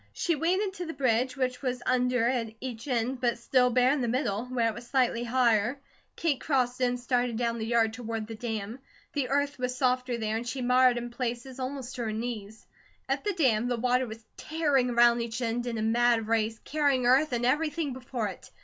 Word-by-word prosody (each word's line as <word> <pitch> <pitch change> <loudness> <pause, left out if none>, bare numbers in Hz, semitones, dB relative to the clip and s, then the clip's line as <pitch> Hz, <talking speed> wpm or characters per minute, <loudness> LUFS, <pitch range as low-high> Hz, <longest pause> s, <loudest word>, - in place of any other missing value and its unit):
She 340 - 0
waded 370 +6 0
to 360 -2 -5
the 325 - -6
bridge, 255 0 +1
which 255 -1 -1
was 250 -2 -2
under 250 -2 +2
at 230 -3 -1
each 245 -1 -6
end 250 0 -1
but 240 -2 +1
still 250 +1 +3
bare 250 +1 +4
in 290 - -1
the 240 - 0
middle, 235 -3 -1
where 250 -2 0
it 225 - -1
was 240 - -10
slightly 245 -3 +1
higher. 240 0 +2 0.4
Kate 310 -6 0
crossed 255 -3 0
it - - +4
and 245 0 -1
started 245 -1 0
down 235 -1 -1
the 220 - -3
yard 230 -2 +2
toward 225 -2 -4
the 225 - -8
dam. 225 0 -4 0.3
The 280 -4 -1
earth 285 0 0
was 250 0 -2
softer 250 -1 +1
there, 220 -1 -1
and 235 +2 -5
she 260 +1 -3
mired 250 0 +4
in 240 0 -5
places 245 +2 -4
almost 260 -1 -4
to 240 - -2
her 220 - -2
knees. 220 -1 -5 0.4
At - - -1
the 415 - 0
dam, 245 -9 +2
the 245 -1 0
water 250 +2 +1
was 220 0 -10
tearing 290 -5 +1
around 240 0 +4
each 230 0 -4
end 240 0 -2
in 235 -1 -2
a 215 - -1
mad 235 0 +3
race, 225 0 +1
carrying 285 -4 +1
earth 265 +5 +4
and 240 0 0
everything 300 +2 0
before 250 -3 -3
it. 185 - -11
245 Hz, 215 wpm, -28 LUFS, 230-260 Hz, 0.4 s, bare